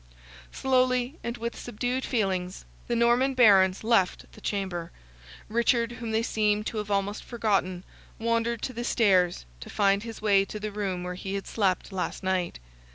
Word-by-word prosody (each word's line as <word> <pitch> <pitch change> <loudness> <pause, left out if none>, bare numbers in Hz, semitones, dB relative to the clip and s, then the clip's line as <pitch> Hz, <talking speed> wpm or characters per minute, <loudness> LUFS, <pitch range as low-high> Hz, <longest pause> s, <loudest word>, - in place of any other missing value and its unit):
Slowly, 255 +2 +1
and 235 +1 -4
with 235 0 -4
subdued 245 +3 -3
feelings, 190 -6 -1 0.2
the 240 - 0
Norman 240 +3 +3
Barons 195 -6 +5
left 220 -5 +2
the 215 - -15
chamber; 185 -5 -3 0.6
Richard, 235 +1 +2
whom 235 -1 -6
they 220 +1 +1
seemed 210 -2 +1
to 220 - -3
have 210 -1 -5
almost 200 +1 -1
forgotten, 195 -6 -1 0.3
wandered 230 0 0
to 255 - -3
the 240 +1 -4
stairs, 185 - +2
to - - -10
find 200 -1 +2
his 225 0 -7
way 200 -2 +4
to 210 +2 -7
the 215 0 -4
room 195 -3 -3
where 180 0 -4
he 190 +2 -5
had 195 - -4
slept 195 -2 0
last 190 +1 -3
night. 185 -2 -1
210 Hz, 165 wpm, -27 LUFS, 195-235 Hz, 0.6 s, Barons